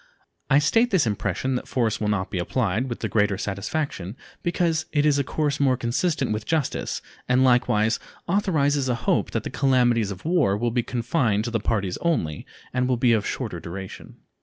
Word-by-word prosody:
I 135 - +5
state 225 +11 +3
this 190 - +3
impression 105 +4 -1
that 125 - -3
force 115 -5 0
will 105 - 0
not 105 -3 -1
be 90 - -2
applied 110 +5 0
with 120 - -5
the - - -1
greater 105 -2 +1
satisfaction 100 - -3 0.2
because 170 -2 0
it 145 -1 +2
is 145 -2 +3
a - - +2
course 145 +1 -1
more 135 -3 +3
consistent 130 +3 0
with 105 0 -2
justice 155 -5 -1 0.3
and 125 +1 +4
likewise 115 -3 +3 0.3
authorizes 145 -8 +1
a 125 - +2
hope - - +2
that - - -2
the - - -5
calamities 120 -5 +2
of 95 -1 -7
the - - -3
war 145 - +3
will 120 +2 0
be 120 +1 +1
confined 115 -2 0
to 120 - -3
the 115 - 0
parties 100 -4 -1
only, 85 - -1 0.3
and 125 0 +1
will 125 -1 +1
be 120 0 +4
of 110 -3 +1
shorter 110 -9 -4
duration. 95 +3 -8
125 Hz, 195 wpm, -24 LUFS, 105-145 Hz, 0.3 s, I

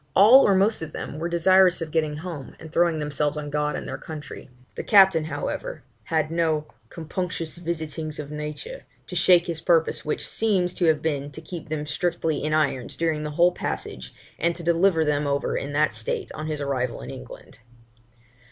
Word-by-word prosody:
All 235 +8 +8
or 200 - +4
most 200 +2 +2
of 160 -1 -6
them 150 - -6
were 170 +2 -2
desirous 180 +1 +4
of 165 -2 -5
getting 155 -2 0
home, 155 -6 -7
and 160 -1 -10
throwing 170 -2 +3
themselves 150 0 -1
on 145 -1 -5
God 150 0 0
and - - -5
their - - -5
country. 155 -3 -9 0.2
The - - -5
captain, 190 -6 +6
however, - - -4 0.2
had 160 -1 0
no 160 -2 +1 0.2
'compunctious 170 0 -4
visitings 160 -2 -4
of 150 -1 -6
nature' 150 - -6 0.2
to 180 - -8
shake 175 0 +5
his 165 -2 -4
purpose, 165 -2 +2
which 150 - -2
seems 190 -5 +1
to 180 - 0
have 160 -2 +2
been, 145 -3 -1
to - - -8
keep 165 0 -8
them 150 -1 -3
strictly 160 -1 -1
in 155 - -1
irons 145 -5 0
during 160 -2 0
the 150 - -3
whole 175 +1 +5
passage, 65 - -5 0.3
and 170 +1 +1
to 170 - -7
deliver 170 0 +3
them 150 -1 0
over 140 0 -1
in 140 - -3
that 150 -3 +2
state 110 +1 -2
on 155 0 -6
his 155 -1 -3
arrival 130 -3 -2
in 65 +2 -7
England. - - -11
160 Hz, 190 wpm, -24 LUFS, 150-175 Hz, 0.3 s, All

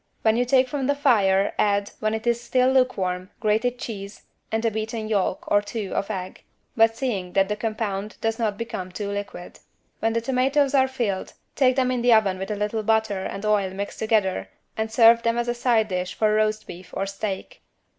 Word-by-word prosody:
When 220 0 +4
you 245 +1 +2
take 255 +1 +3
from 270 0 -2
the 285 - +2
fire 205 -9 +3
add, 200 -1 +1
when 215 0 0
it 220 +1 -6
is 235 0 +1
still 255 +1 +2
lukewarm, 190 -8 0
grated 225 +3 +1
cheese 200 -4 -7 0.3
and 225 +1 -1
a 225 - +2
beaten 220 +1 -4
yolk 200 -3 0
(or 205 - +3
two) 205 -1 -5
of 200 - -2
egg, 185 -3 -5 0.3
but 225 0 +4
seeing 200 -9 -3
that 195 0 +2
the 210 - 0
compound 215 -2 -3
does 225 +1 -1
not 215 -3 0
become 190 -6 -5
too 200 +2 -4
liquid. 200 -3 -6 0.4
When 225 0 0
the 230 - 0
tomatoes 270 +3 +1
are 265 -1 +4
filled, 235 -8 -3 0.2
take 255 -2 +3
them 255 -1 +2
in 250 -1 -1
the 240 0 +5
oven 200 -4 +3
with 190 - -5
a 210 - -1
little 210 +2 -2
butter 215 -3 0
and 195 +2 -5
oil 210 -2 +2
mixed 200 +1 -5
together 195 - 0 0.3
and 220 0 -2
serve 230 0 +6
them 230 0 0
as 240 0 -1
a 240 - +1
side 235 -3 +1
dish 185 0 -3
for 215 -1 +2
roast 215 0 +1
beef 175 +1 -11
or 195 - 0
steak. 200 - -5
220 Hz, 205 wpm, -24 LUFS, 200-235 Hz, 0.4 s, serve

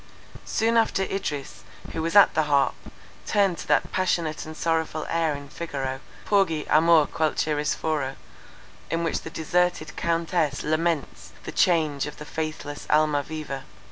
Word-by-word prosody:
Soon 230 +1 +2
after 225 -4 +2
Idris, 150 -8 -4 0.3
who 160 - -2
was 165 +3 -2
at 205 - +8
the 155 -1 +2
harp, 140 -1 +3 0.5
turned 200 -4 +2
to - - -7
that 145 -2 +2
passionate 170 -5 -1
and 155 0 -8
sorrowful 160 -1 -1
air 165 -3 +1
in 140 0 -8
Figaro, 135 -4 -4 0.3
"Porgi, 190 -7 +2
amor, 160 0 +5
qualche 155 0 0
ristoro," 150 -2 -1 0.7
in 165 0 -1
which 165 - -1
the - - -7
deserted 160 0 0
Countess 165 -3 0
laments 155 0 -1
the - - -6
change 155 -6 +2
of 150 - -8
the 150 - -8
faithless 155 -2 -5
Almaviva. 150 -2 0
155 Hz, 140 wpm, -25 LUFS, 150-170 Hz, 0.7 s, at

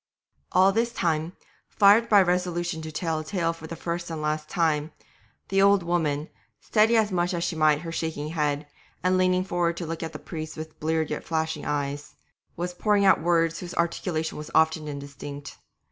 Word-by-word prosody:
All 190 +1 +5
this 230 +3 0
time, 165 -1 -1 0.4
fired 210 +3 +5
by 205 -2 +7
a - - +3
resolution 175 -2 -1
to 155 0 -6
tell 160 0 -2
a - - -5
tale 165 -1 -1
for 160 -1 -10
the 165 - -6
first 170 +1 -4
and 160 -1 -4
last 155 0 -2
time, 160 -4 0 0.6
the 195 0 +3
old 200 -1 +5
woman, 160 -3 0 0.3
steadying 225 +1 +3
as 215 -2 +1
much 175 0 0
as 170 - -2
she 170 - -1
might 155 -1 +3
her 165 - -6
shaking 160 -2 -3
head, 150 -2 -1 0.4
and 185 0 +3
leaning 185 0 +3
forward 175 -2 0
to 170 - -4
look 165 0 -5
at 160 -1 -4
the 155 - -7
priest 155 -1 -7
with 155 0 -8
bleared 160 0 0
yet - - -3
flashing 160 -2 -2
eyes, 145 0 -3 0.4
was 175 +1 -3
pouring 205 +2 +2
out 190 - +5
words 165 0 +2
whose 175 -1 -7
articulation 170 -2 -1
was 150 - -7
often 160 -1 +3
indistinct. 140 0 -8
165 Hz, 190 wpm, -26 LUFS, 155-180 Hz, 0.6 s, by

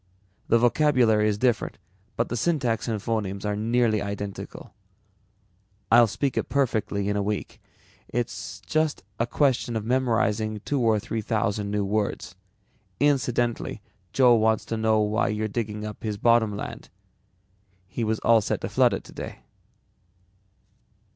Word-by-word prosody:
The 115 - +4
vocabulary 120 -4 +3
is 105 - -1
different 120 +1 0 0.4
but 115 - -1
the - - -2
syntax 125 -4 0
and 110 -2 -1
phonemes 100 -2 -3
are 105 0 0
nearly 110 0 +1
identical. 100 0 -6 1.2
I'll 120 0 +7
speak 135 +6 -2
it - - -1
perfectly 110 -7 0
in 105 - 0
a 105 - +1
week. 105 0 -4 0.5
It's 95 -5 -4
just 155 +7 -1 0.2
a 115 - +1
question 125 -3 +1
of 110 -1 -2
memorizing 115 -4 +1
two 145 - 0
or 110 -2 +3
three 115 +1 -4
thousand 105 -2 -1
new 105 -1 0
words. 100 -2 -2 0.7
Incidentally, 120 -6 0 0.3
Joe 125 -2 +5
wants 110 -1 +2
to 115 - -3
know 110 -1 +2
why 105 +1 +1
you're 110 -1 -1
digging 105 -1 -4
up 105 -1 -7
his 105 -2 -3
bottom 110 -2 +3
land. - - -7 1.0
He 105 +5 -4
was 110 0 0
all 115 -1 +5
set - - -2
to - - -3
flood - - +3
it - - -6
today." - - -8
110 Hz, 145 wpm, -25 LUFS, 105-120 Hz, 1.2 s, I'll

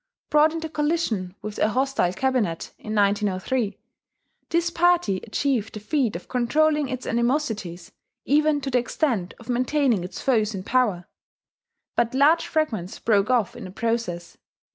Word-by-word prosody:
Brought 300 +1 +5
into 325 0 -4
collision 295 - -1
with 215 -1 -6
a 215 - +3
hostile 260 -6 +1
cabinet 225 -6 -1
in 215 0 -5
1903, 205 +2 0 0.7
this 340 0 +1
party 345 - +3
achieved 230 +1 -2
the - - -5
feat 240 - 0
of 170 - -7
controlling 295 +4 +1
its 255 -1 -4
animosities 225 - -1 0.3
even 300 +1 +3
to 270 0 -4
the 250 - +3
extent 240 - -1
of 235 - -14
maintaining 250 -4 +1
its 180 - -7
foes 220 -5 +1
in 185 - -5
power; 210 -7 +1 0.9
but 235 +1 +1
large 305 +5 +4
fragments 225 - -1
broke 210 -1 +2
off 240 -7 +1
in - - -8
the - - -7
process. 200 -5 -3
240 Hz, 145 wpm, -24 LUFS, 205-290 Hz, 0.9 s, Brought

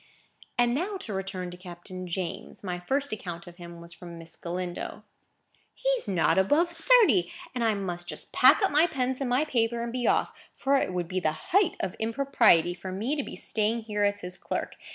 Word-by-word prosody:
And 240 -1 +3
now 375 +9 -1
to 225 - -5
return 190 -2 -4
to 180 - -9
Captain 180 +1 -8
James. 175 +2 -5
My 180 -2 -3
first 275 +8 0
account 175 -5 -6
of 175 0 -12
him 170 -1 -10
was 170 0 -8
from 175 -2 -10
Miss 165 0 -8
Galindo. 175 0 -5 0.7
"He's - - 0
not 185 -1 +3
above 300 - +3
thirty; 335 - +4 0.2
and 245 -2 -1
I 220 -2 +3
must 175 -3 -3
just - - -7
pack - - +6
up 395 - +3
my 305 +4 +5
pens 260 -3 -2
and 265 - -1
my 255 +5 +2
paper, 235 -4 0
and 235 - -3
be 250 -1 -1
off; - - +2 0.2
for 275 +1 +2
it 225 - 0
would 180 -2 -2
be 185 +2 -1
the 160 - -3
height 390 -2 +4
of 185 - -3
impropriety 225 -7 +3
for 185 +1 -7
me 220 +10 -1
to 290 - -1
be - - -7
staying 220 +2 0
here 210 -2 -2
as 205 0 +1
his 180 +1 -7
clerk. - - -3
205 Hz, 205 wpm, -28 LUFS, 180-265 Hz, 0.7 s, pack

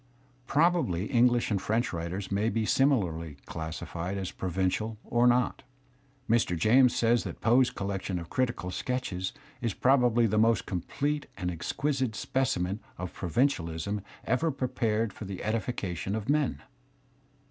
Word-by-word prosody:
Prob 170 +6 +4
ably 95 - -1
English 120 0 +3
and 100 -2 +1
French 115 +3 0
writers 85 +4 -4
may 100 +3 +1
be 115 -1 0
similarly 90 - +1
classified 85 +3 -5
as 95 -2 -3
provincial 95 +4 -1
or 120 +1 +3
not. 125 +1 +2 0.7
Mr. 110 -7 +2
James 120 +8 +5
says 120 +1 +3
that - - -6
Poe's 125 +2 +4
collection 95 -2 -3
of 85 -1 -6
critical 115 -7 -1
sketches 95 -4 -2 0.3
"is 115 -5 -1
probably 125 -3 +4
the 110 0 +2
most 115 0 +3
complete 145 - -2
and 90 -2 -2
ex 85 -1 -4
quisite 135 -5 -1
specimen 105 -8 0 0.2
of 90 -1 -6
provincicdism 95 - 0 0.2
ever 160 +6 +1
prepared 115 -6 -1
for 105 - -8
the 95 -1 -5
edifi 110 +3 -2
cation 95 +1 -3
of 110 -1 -4
men." 145 - +1
110 Hz, 145 wpm, -29 LUFS, 90-125 Hz, 0.7 s, James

